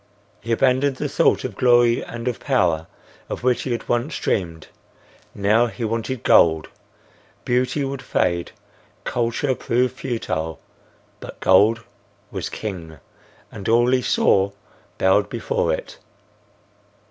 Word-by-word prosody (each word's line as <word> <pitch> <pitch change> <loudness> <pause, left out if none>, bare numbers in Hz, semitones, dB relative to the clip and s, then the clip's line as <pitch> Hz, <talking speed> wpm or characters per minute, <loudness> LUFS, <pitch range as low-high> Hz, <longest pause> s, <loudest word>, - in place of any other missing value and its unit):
He 115 - -5
abandoned 130 +3 +2
the - - -3
thought - - +2
of - - -5
glory 120 -1 +4
and 120 +1 -7
of 125 - -2
power, 85 - +1 0.4
of - - -5
which 125 -1 +2
he 130 - -4
had 120 -2 -3
once 120 +5 -1
dreamed. 85 -5 -2 0.7
Now 105 +4 +3
he 115 0 -5
wanted 115 +2 -3
gold. 80 -2 +4 0.8
Beauty 125 +3 0
would 135 -1 -5
fade, 85 -8 -1 0.5
culture 120 +3 -1
prove 125 0 0
futile; 115 -11 -4 0.6
but - - -10
gold 110 +5 +4 0.5
was - - -4
king, 85 -7 -6 0.5
and 100 - -6
all 120 +2 +4
he 130 -1 +3
saw 100 -4 +2 0.4
bowed 95 +2 +3
before 485 +1 -1
it. - - -5
115 Hz, 125 wpm, -22 LUFS, 100-125 Hz, 0.8 s, glory